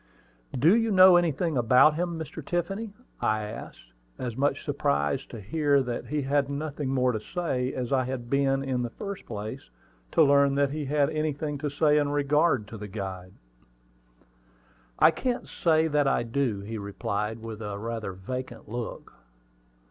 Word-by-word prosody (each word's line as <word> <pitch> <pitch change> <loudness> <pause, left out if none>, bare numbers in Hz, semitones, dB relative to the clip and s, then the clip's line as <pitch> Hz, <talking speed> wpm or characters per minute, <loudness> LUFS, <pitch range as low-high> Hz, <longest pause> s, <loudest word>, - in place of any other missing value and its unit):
"Do 160 - +5
you 225 -1 +2
know 185 -2 +8
anything 170 -2 +1
about 125 +5 +6
him, 170 +1 -2
Mr. 160 0 -7
Tiffany?" 195 +7 -3 0.2
I 110 0 +1
asked, 105 - -9 0.3
as 120 -3 -4
much 140 +3 0
surprised 70 0 0
to 115 - -8
hear 140 +6 +2
that 120 -2 -4
he 150 -1 -1
had 140 +1 +1
nothing 145 -1 -3
more 130 -1 +2
to 110 - -2
say 130 - -2
as 125 0 -2
I 130 -1 +2
had 125 -2 -4
been, 135 +1 +1
in 130 -2 -1
the 120 - -2
first 200 - -7
place, 110 +4 -6 0.4
to 160 - +4
learn 140 -1 +4
that 140 -1 +2
he 150 0 -3
had 145 +1 +1
anything 155 -1 -2
to 145 +1 -2
say 150 +1 +3
in 145 -1 0
regard 145 -4 +2
to 110 - -8
the 105 - -6
guide. 95 -2 -6 1.6
"I 160 - +6
can't 245 +7 -2
say 160 -2 +2
that 145 -2 +2
I 135 - +2
do," 115 -3 -1
he 110 +2 -5
replied, 105 +1 -3
with 115 -1 -8
a 105 -2 -4
rather 110 -2 -4
vacant 125 +8 -6
look. 120 +2 -6
135 Hz, 170 wpm, -27 LUFS, 115-155 Hz, 1.6 s, know